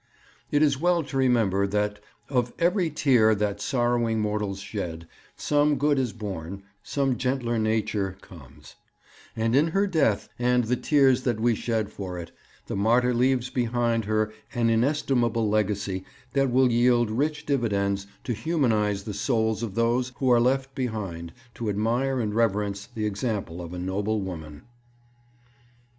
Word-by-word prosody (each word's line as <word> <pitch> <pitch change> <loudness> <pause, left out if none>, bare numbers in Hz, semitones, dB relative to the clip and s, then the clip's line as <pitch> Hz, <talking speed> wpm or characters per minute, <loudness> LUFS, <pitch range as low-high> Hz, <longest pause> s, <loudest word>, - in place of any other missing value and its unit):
It 145 +1 +3
is 140 -2 +2
well 175 -1 +2
to 140 - -8
remember 110 -7 +2
that 105 +1 -1 0.3
'of 125 -3 0
every 175 0 +2
tear 125 -7 +3
that 105 -1 -2
sorrowing 120 -3 +1
mortals 105 -2 -1
shed, 85 -5 -5 0.3
some 150 0 +2
good 145 -1 +2
is 125 -4 0
born, 100 -3 -6 0.2
some 135 +4 -1
gentler 125 -3 0
nature 110 -3 -1
comes'; 75 -11 -15 0.6
and 115 +2 +1
in 145 +4 +4
her 195 +5 +1
death 155 - +1
and 125 0 +2
the 120 +3 0
tears 135 -2 +3
that 120 -4 -1
we 120 +1 +3
shed 110 -2 -2
for 95 -3 -6
it, 85 -1 -7 0.3
the - - -4
martyr 120 +5 +3
leaves 125 0 +1
behind 120 -2 0
her 110 0 0 0.2
an 115 -1 +2
inestimable 120 -2 +1
legacy 100 -2 -1 0.3
that 135 -1 +2
will 130 0 +3
yield 120 -1 +3
rich 150 +5 -1
dividends 100 -7 0 0.2
to 120 - -2
humanize 110 -7 0
the 105 - -5
souls 110 +1 0
of 110 -4 -4
those 120 +2 +1
who 130 -2 +1
are 120 -1 +5
left 135 +2 +1
behind 100 -10 -4 0.2
to 115 -2 -4
admire 120 +6 0
and 105 -3 -1
reverence 105 -3 0
the 115 -3 -4
example 105 -5 -3
of 85 -1 -8
a 90 - -6
noble 100 +4 -1
woman. 80 -6 -7
115 Hz, 150 wpm, -26 LUFS, 105-130 Hz, 0.6 s, are